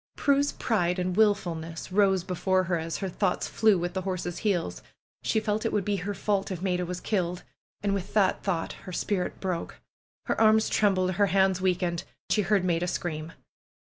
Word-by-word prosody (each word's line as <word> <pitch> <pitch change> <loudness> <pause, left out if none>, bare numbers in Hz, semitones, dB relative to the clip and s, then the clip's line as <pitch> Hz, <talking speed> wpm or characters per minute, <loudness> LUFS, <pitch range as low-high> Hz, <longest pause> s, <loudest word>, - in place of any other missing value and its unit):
Prue's 285 0 +2
pride 180 -6 0
and 180 0 -1
wilfulness 170 -6 0
rose 190 -2 +3
before 185 +1 +1
her 175 -1 0
as 165 0 -3
her - - -1
thoughts 185 0 -1
flew 215 -3 +3
with 175 0 -2
the 190 - -2
horse's 180 -2 -3
heels. 175 - -1 0.4
She 220 - +1
felt 215 0 -1
it 225 - 0
would 205 -3 0
be 205 -1 0
her 200 +2 -4
fault 200 -1 0
if 185 -3 -4
Maida 180 -1 -1
was 180 0 -4
killed. 180 -4 -1 0.4
And 200 -1 +1
with 195 0 -3
that 200 -3 +3
thought 175 -4 -2 0.2
her - - -7
spirit 185 0 -2
broke. 180 -3 -3 0.5
Her - - 0
arms 220 0 +5
trembled; 185 -3 +2
her 200 +2 +2
hands 190 -1 +2
weakened. 180 -2 0 0.3
She 210 - +4
heard 195 -1 +2
Maida 175 0 +1
scream. 160 -2 -3
185 Hz, 185 wpm, -27 LUFS, 175-205 Hz, 0.5 s, arms